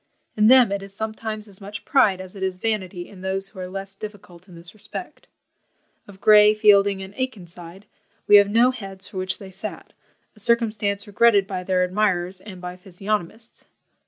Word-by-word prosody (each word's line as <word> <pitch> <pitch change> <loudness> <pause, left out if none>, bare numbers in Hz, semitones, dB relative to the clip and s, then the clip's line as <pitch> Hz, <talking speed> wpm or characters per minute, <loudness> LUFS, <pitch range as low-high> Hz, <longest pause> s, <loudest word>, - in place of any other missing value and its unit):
In 215 0 +4
them 250 -3 +6
it 200 0 -2
is 195 0 -11
sometimes 220 0 -5
as 200 0 -9
much 205 +2 -8
pride 220 -9 +3
as 185 +1 -11
it 195 - -9
is 190 -1 -2
vanity 185 -4 -3
in 190 -2 -14
those 190 +1 -2
who 190 - -13
are 180 - -5
less 195 +1 -7
difficult 195 -3 -11
in 175 - -13
this 170 +1 -12
respect. 215 0 -9 0.8
Of 195 -2 -14
Gray, 210 +1 +6
Fielding, 200 -2 +4
and 190 +1 -11
Akenside, 185 -7 -7 0.4
we 205 - +8
have 200 0 +5
no 235 +4 +4
heads 195 -6 -6
for - - -10
which 185 0 -2
they 195 -1 -11
sat; 195 +3 -7 0.4
a - - -15
circumstance 210 -2 0
regretted 205 -1 +3
by 185 -2 -5
their 185 0 +1
admirers, 185 -1 -1
and 190 -4 -11
by 180 0 -7
physiognomists. 200 +4 -5
200 Hz, 185 wpm, -23 LUFS, 185-215 Hz, 0.8 s, we